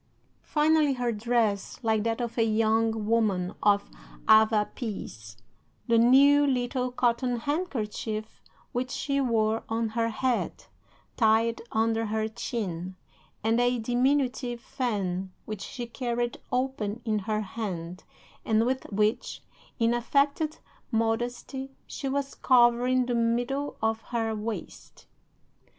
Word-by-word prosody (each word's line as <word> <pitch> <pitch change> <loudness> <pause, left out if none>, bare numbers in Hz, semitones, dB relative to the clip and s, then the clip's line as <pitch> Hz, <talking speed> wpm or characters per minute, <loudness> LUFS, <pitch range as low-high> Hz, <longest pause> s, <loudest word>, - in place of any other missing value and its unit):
Finally, 305 -1 +3
her 245 -2 -1
dress, 220 -2 0
like 220 -2 +2
that 230 +1 -1
of 235 -2 -3
a 230 - +3
young 225 0 +1
woman 210 -5 +1
of 205 -1 +3 0.4
Avapies 210 - +1 0.5
the 230 -1 +4
new 280 +5 +6
little 250 -1 0
cotton 245 0 +1
handkerchief 225 -7 -3 0.3
which 250 +1 -2
she 280 +1 -1
wore 225 -3 +1
on 225 0 0
her 230 +1 0
head, 245 +2 -1 0.5
tied 225 0 +3
under 225 0 +1
her 220 +1 -1
chin, 190 -6 -4 0.5
and 225 +2 +2
a 245 0 +2
diminutive 245 +1 0
fan 195 -7 -2
which 215 -2 -6
she 245 +3 -5
carried 240 0 -3
open 250 -4 -2
in 215 -2 +1
her 215 +2 -1
hand, 185 -4 -5 0.4
and 220 0 +2
with 260 +1 -1
which, 210 +2 0 0.3
in 230 0 +2
affected 280 +5 +1 0.3
modesty, 240 +4 -2
she 275 - -5
was 275 0 -2
covering 250 0 +4
the 245 - -1
middle 240 +5 0
of 220 0 +1
her 225 -2 -2
waist. 215 +1 -6
230 Hz, 120 wpm, -27 LUFS, 220-250 Hz, 0.5 s, new